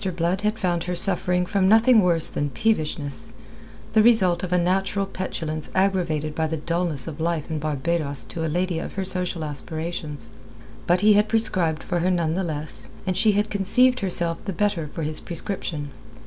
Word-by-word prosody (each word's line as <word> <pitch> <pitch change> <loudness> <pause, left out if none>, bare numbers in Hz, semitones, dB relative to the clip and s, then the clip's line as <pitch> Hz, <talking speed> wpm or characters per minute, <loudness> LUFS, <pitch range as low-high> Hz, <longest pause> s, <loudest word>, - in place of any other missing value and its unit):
Blood 175 +3 -1
had 210 +1 -1
found 175 -4 -1
her 180 0 -3
suffering 180 -1 +2
from 190 0 +1
nothing 225 +1 +6
worse 170 -3 +4
than 145 0 -2
peevishness 150 - -2 0.6
the 220 - +5
result 195 -7 +3
of 180 - -4
a 180 - +3
natural 195 +3 0
petulance 160 -5 -4
aggravated 175 -6 0
by 160 +1 -1
the 160 +1 -3
dulness 170 -2 -2
of 160 -1 -7
life 165 -1 -2
in 155 - -2
Barbados 150 -2 -1
to 165 - -4
a - - -1
lady 175 +1 -1
of - - -6
her 195 -1 -3
social 180 -3 +1
aspirations. 155 0 -6 0.6
But 180 +1 +3
he 210 0 +6
had 210 +1 +3
prescribed 180 -8 +2
for 175 -2 -2
her 180 +2 +1
none 170 -3 0
the 190 +3 -1
less, 155 -2 -3 0.2
and 185 -1 -1
she 215 +2 +3
had 210 +1 0
conceived 250 +6 +3
herself 170 -4 -1
the 195 - -3
better 200 -4 -1
for 160 +2 -6
his 155 0 -1
prescription. 165 -4 -4
175 Hz, 185 wpm, -23 LUFS, 160-195 Hz, 0.6 s, nothing